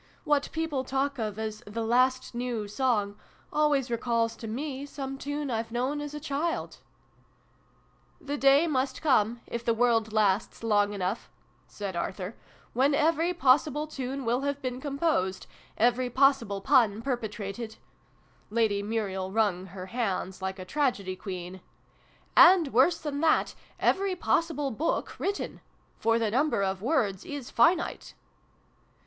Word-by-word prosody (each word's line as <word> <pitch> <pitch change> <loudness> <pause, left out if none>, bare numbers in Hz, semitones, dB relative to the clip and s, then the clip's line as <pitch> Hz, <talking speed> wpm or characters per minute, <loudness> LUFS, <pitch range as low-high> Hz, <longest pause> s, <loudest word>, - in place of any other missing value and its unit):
What 290 -1 +1
people 320 -5 -2
talk 270 +1 -1
of 215 -2 -3
as 215 -1 -4
' - - -34
the 225 +2 -3
last 255 +3 +2
new 240 -3 -3
song' 210 -2 0 0.3
always 290 -4 +2
recalls 230 -1 0
to 225 - -7
me 270 +4 -4
some 270 -1 -5
tune 290 0 -4
I've 225 0 -2
known 260 +5 -1
as 295 0 -6
a - - -4
child! 300 +3 -3 0.5
" - - -37
" - - -23
The 290 - 0
day 275 +3 +5
must 265 -3 -1
come 235 -5 +2
if 235 0 -5
the 230 -1 +1
world 230 -2 +2
lasts 210 0 +1
long 205 -2 +2
enough 195 +2 -3 0.2
' - - -36
said 200 -3 -4
Arthur, 185 +3 -4 0.4
"when 275 +4 +3
every 325 +3 +2
possible 295 +1 +3
tune 270 -3 -5
will 240 +3 +1
have 280 0 -2
been 255 -1 -4
composed 280 - -1 0.3
every 245 +2 +2
possible 245 -6 +2
pun 225 -3 +3
perpetrated 220 -3 -4 0.4
" - - -35 0.3
(Lady 215 -2 +1
Muriel 200 -3 -2
wrung 195 -4 +1
her 185 0 -8
hands, 190 -4 -3
like 190 0 -3
a 185 - -7
tragedy 200 -6 -1
queen) 185 -1 -7 0.7
"and, 355 -6 +7
worse 270 +8 +4
than 295 -2 -4
that, 325 -1 +3 0.3
every 390 -1 +2
possible 325 -5 0
book 300 +8 -2
written! 400 +1 -3 0.4
For 225 0 +3
the 225 -2 0
number 265 -4 +2
of 190 -1 -1
words 220 - 0
is 280 -3 -7
finite." 330 +9 +2
245 Hz, 150 wpm, -28 LUFS, 210-280 Hz, 0.7 s, and